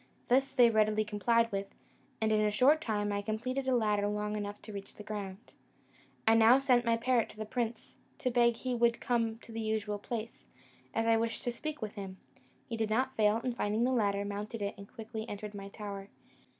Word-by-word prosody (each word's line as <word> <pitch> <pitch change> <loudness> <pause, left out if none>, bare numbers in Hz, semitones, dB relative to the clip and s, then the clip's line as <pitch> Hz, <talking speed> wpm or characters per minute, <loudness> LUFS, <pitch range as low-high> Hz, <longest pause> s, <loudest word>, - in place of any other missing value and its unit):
This 270 +3 +3
they 245 -3 +6
readily 215 0 +3
complied 230 +2 +2
with, 195 0 -2 0.5
and 220 0 +1
in 215 0 +3
a 210 - +3
short 265 +9 +4
time 205 -4 -1
I 200 0 -1
completed 250 +6 -2
a 260 - +3
ladder 210 -3 +2
long 210 0 -2
enough 205 0 -4
to 215 - -9
reach 200 -1 -6
to - - -26
the 210 - -8
ground. 205 0 -7 0.7
I 225 - +7
now 225 +3 +7
sent 255 -3 +3
my 230 0 +4
parrot 240 -1 +2
to - - -14
the 215 - -4
prince, 235 +1 -4 0.2
to 255 - -1
beg 235 -1 +4
he 255 +2 -3
would 235 0 +2
come 230 -2 0
to 235 - -14
the 225 0 -4
usual 215 -1 -1
place, 225 +1 -6 0.4
as 225 - 0
I 225 0 +4
wished 230 0 -1
to 245 - 0
speak 300 +2 -5
with 210 - -4
him. 195 -3 -7 0.5
He 230 - -3
did 220 -1 0
not 255 +4 +1
fail; 215 0 +3
and 250 -2 -1
finding 215 0 0
the 255 - +2
ladder, 200 -4 +1
mounted 205 +2 -4
it, 200 - -2
and 200 0 -12
quickly 220 0 -6
entered 205 0 -6
my 200 -1 -7
tower. 200 -1 -7
220 Hz, 215 wpm, -32 LUFS, 210-235 Hz, 0.7 s, I